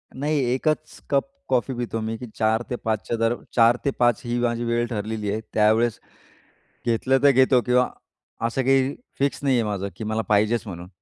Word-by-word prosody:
नाही, 145 +3 0
1च 155 +3 -1
cup 140 - +2 0.2
coffee 130 +1 +1
पितो 120 -2 -3
मी 110 +1 -3
की 125 - -7
4-5च्या 110 0 -1
दर 115 +1 +1 0.2
4-5 120 0 +3
ही 120 0 -1
माझी 120 -1 0
वेळ 120 0 0
ठरलेली 105 -2 -3
आहे. 110 +1 -2
त्यावेळेस 110 +2 +3 0.9
घेतलं 120 +3 +2
तर 140 - +8
घेतो 130 -1 +4
किंवा 125 +1 +2 0.6
असं 130 +3 -1
काही 135 +1 +2 0.2
फिक्स 140 +1 0
नाहीये 130 -4 +3
माझं 100 -2 -2
की 110 - -7
मला 110 +1 -1
पाहिजेच 110 +2 +2
म्हणून. 90 -2 -7
120 Hz, 160 wpm, -24 LUFS, 110-130 Hz, 0.9 s, तर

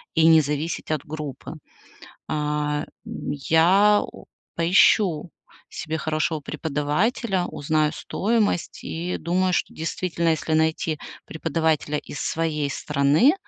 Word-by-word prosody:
и 160 -1 +4
не 160 -1 +7
зависеть 150 +3 -3
от 155 -3 -2
группы. 150 -3 -6 0.8
А, 150 0 -1 0.2
м, - - -5
я, 180 +8 +4
у - - -11 0.3
поищу 175 0 +3 0.4
себе 160 0 -4
хорошего 155 0 -1
преподавателя, 160 - -1
узнаю 155 -1 0
стоимость 210 -4 -1
и 175 +2 -3
думаю, 180 +3 0
что - - -1
действительно, 170 +1 -2
если 160 0 0
найти 160 0 +1 0.3
преподавателя 160 -1 -1
из 140 - -9
своей 155 -3 -1
страны, 150 - +3
160 Hz, 110 wpm, -24 LUFS, 150-175 Hz, 0.8 s, не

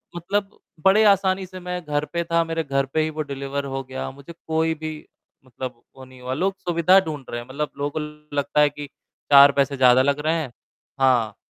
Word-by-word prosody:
मतलब 200 +4 -3 0.3
बड़े 205 +3 +6
आसानी 190 -1 +3
से 185 0 -10
मैं 180 0 -5
घर 145 0 -1
पे 170 0 0
था, 170 0 +1
मेरे 165 0 -2
घर 135 -1 0
पे 160 - +2
ही 155 - 0
वो 155 0 -4
डिलीवर 140 +1 -4
हो 135 - -3
गया, 130 +1 -6
मुझे 140 +5 -12
कोई 160 0 +1
भी 155 0 -5 0.5
मतलब 125 -1 -8
वो 130 -1 -12
नहीं 130 -1 -16
हुआ। 130 +1 -4
लोग 190 +7 -1
सुविधा 180 +1 +4
ढूँढ़ 155 -7 -5
रहे 120 0 -4
हैं, 120 - -13
मतलब 145 +3 -4
लोगों 145 +2 -3 0.4
लगता 145 +1 +1
है 145 - +5
कि 145 0 -8 0.4
4 140 0 +9
पैसे 140 0 +1
ज़्यादा 130 0 +6
लग 140 +2 +1
रहे 160 +1 +2
हैं, 130 -5 -6 0.5
हाँ, 120 -5 +2
150 Hz, 210 wpm, -23 LUFS, 135-170 Hz, 0.5 s, 4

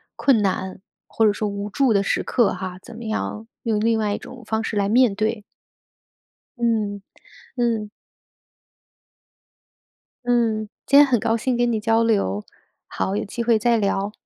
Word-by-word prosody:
困 255 -6 +3
难 190 -1 -2 0.3
或 225 - +1
者 210 - +5
说 210 +1 -2
无 200 0 -4
助 255 +2 +2
的 200 -1 +2
时 - - 0
刻 235 -5 +2
哈， 185 0 -6
怎 235 - -12
么 230 +1 -8
样 220 0 -3 0.2
用 220 -3 0
另 225 +1 +2
外 210 -2 0
一 - - -2
种 250 -1 -11
方 220 +1 -1
式 220 - -3
来 200 -1 +1
面 240 -2 +4
对。 215 +1 -1 1.1
嗯， 215 -4 0 0.6
嗯。 230 -4 0 2.4
嗯， 225 -3 +1 0.2
今 280 - +6
天 290 - +8
很 255 -4 +2
高 225 +2 +1
兴 240 +2 -1
跟 240 0 +2
你 220 - 0
交 225 +1 +2
流。 150 - +1 0.4
好， 190 - -2
有 - - -2
机 235 +4 -4
会 230 -1 +3
再 235 +1 +2
聊。 200 -1 0
220 Hz, 175 characters per minute, -22 LUFS, 205-235 Hz, 2.4 s, 天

